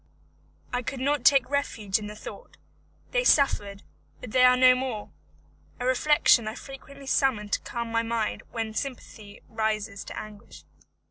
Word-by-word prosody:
I 245 - 0
could 260 +2 -5
not 280 0 0
take 270 -1 +5
refuge 230 -8 -1
in 210 - -7
the 210 - -8
thought: 215 - -11 0.5
they - - +1
suffered, 205 - +2 0.4
but 245 - -9
they 255 +1 +4
are 250 0 +6
no 255 0 +7
more! 255 -5 -4 0.7
a 245 - -3
reflection 255 -3 +4
I 215 - -4
frequently 275 0 -11
summon 255 -6 +1
to - - 0
calm 235 -1 -5
my 230 0 +2
mind 230 -1 -2
when 225 -2 -4
sympathy 220 -5 -7
rises 215 -2 -2
to - - -8
anguish. 210 -1 -12
235 Hz, 155 wpm, -26 LUFS, 215-265 Hz, 0.7 s, no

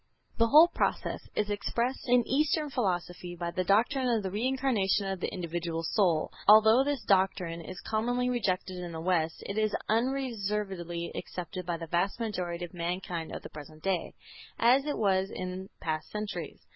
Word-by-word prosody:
The 230 - +5
whole 305 +7 +8
process - - -1
is 210 0 0
expressed 235 +5 -2
in 245 -1 +4
Eastern 300 +2 +1
philosophy 175 -6 -2
by 170 0 -3
the 185 - -1
doctrine 240 +8 +2
of 225 -3 +1
the 190 - -3
Reincarnation 225 -3 +1
of 195 -1 -3
the - - -2
individual 170 -2 -3
soul. 170 -3 +1 0.2
Although 220 +4 +8
this 280 -3 -2
doctrine 185 -4 +1
is 185 +3 -8
commonly 245 +3 0
rejected 190 -6 -1
in 175 -1 -6
the 160 - -5
West, 165 -2 0
it 200 +2 -2
is 215 -1 +1
unreservedly 210 -8 -1
accepted 180 0 -6
by 170 -1 -1
the 165 - -6
vast 175 +7 0
majority 180 -6 -3
of 175 - -14
mankind 175 -1 -3
of - - -6
the - - -8
present 155 +1 -11
day, 190 -3 -1 0.4
as 255 +4 +4
it 295 - -2
was 195 -2 +2
in 185 +1 -5
past 155 -1 -3
centuries. 210 0 -5
195 Hz, 170 wpm, -30 LUFS, 175-230 Hz, 0.4 s, whole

